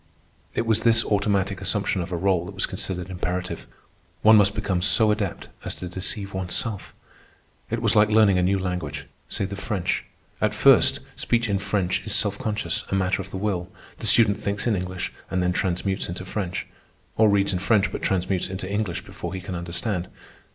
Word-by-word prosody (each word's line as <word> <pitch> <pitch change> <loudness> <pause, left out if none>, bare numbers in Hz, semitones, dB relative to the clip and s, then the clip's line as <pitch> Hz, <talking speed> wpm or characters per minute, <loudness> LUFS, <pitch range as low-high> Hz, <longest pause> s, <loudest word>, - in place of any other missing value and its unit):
It - - 0
was 110 -2 +2
this 115 -1 +4
automatic 100 -2 0
assumption 95 0 0
of 85 +2 -6
a 90 - -1
rôle 90 -1 +1
that 100 - -9
was 95 - +1
considered 95 -1 -4
imperative. 90 0 -3 0.6
One 110 +1 +8
must 100 -1 +4
become 95 -4 -1
so 110 +3 +4
adept 105 -3 -3
as - - -3
to 90 - -6
deceive 95 +2 -3
oneself. 95 +3 -3 0.8
It 115 +1 -2
was 115 - +3
like 105 0 +5
learning 105 -4 +5
a - - +3
new 95 +2 +2
language, 90 -6 -3 0.2
say - - -1
the 100 +1 -5
French. 95 -2 -2 0.4
At - - +1
first - - +5
speech 120 0 +1
in 100 -2 0
French 95 -2 0
is 110 - +1
self 100 -2 +1
conscious, 105 -6 -2
a - - 0
matter 95 0 +1
of 95 - -9
the 95 - -5
will. 95 -3 -2 0.3
The - - -1
student 105 -1 +5
thinks 100 +1 -2
in 115 -3 +2
English 90 -1 -4 0.2
and 90 -1 0
then 90 0 +1
transmutes 95 +1 -1
into 90 +2 -5
French, 95 -2 -3 0.5
or 110 -1 +5
reads 100 -1 +3
in 90 - 0
French 100 -1 +2
but - - -5
transmutes 95 -1 0
into 95 0 -5
English 100 -3 -2
before - - -6
he - - -3
can 90 +1 -6
understand. 90 +2 -3
95 Hz, 195 wpm, -24 LUFS, 90-105 Hz, 0.8 s, One